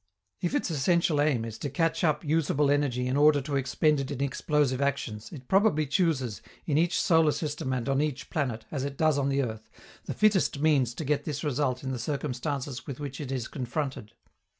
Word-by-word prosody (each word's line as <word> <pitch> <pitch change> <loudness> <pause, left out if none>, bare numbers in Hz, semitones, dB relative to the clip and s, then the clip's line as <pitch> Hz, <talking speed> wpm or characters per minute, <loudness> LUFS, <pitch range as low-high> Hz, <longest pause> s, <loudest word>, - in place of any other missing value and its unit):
If 175 - -1
its - - 0
essential 160 0 +2
aim 140 -7 +1
is 110 -1 -7
to 145 - -3
catch 165 +6 0
up 155 -1 +1
usable 150 -2 +2
energy 135 -4 +1
in 130 +1 0
order 145 0 +5
to 140 +1 -3
expend 140 +3 +2
it 135 -1 -3
in 140 -3 -4
explosive 140 -1 0
actions, 125 -6 -2
it 130 -7 -10
probably 190 -6 +3
chooses, 140 - 0 0.2
in 150 - 0
each 170 +3 +2
solar 160 -5 +4
system 150 -2 -3
and 125 -1 -2
on 135 +1 +2
each 145 -3 -3
planet, 125 -8 -2
as 135 -3 -2
it 140 -1 -4
does 155 -2 +3
on 140 0 +1
the 140 0 +1
earth, 110 -2 -6 0.4
the - - -4
fittest 210 -7 +3
means 140 -6 +2
to 160 - -5
get 145 0 0
this 145 -2 -3
result 135 -3 -1
in 130 - -3
the 130 - -3
circumstances 135 -1 -3
with 135 -1 -6
which 140 -1 -5
it 135 -2 -5
is 130 -4 -2
confronted. 130 -3 -4
140 Hz, 205 wpm, -28 LUFS, 130-155 Hz, 0.4 s, order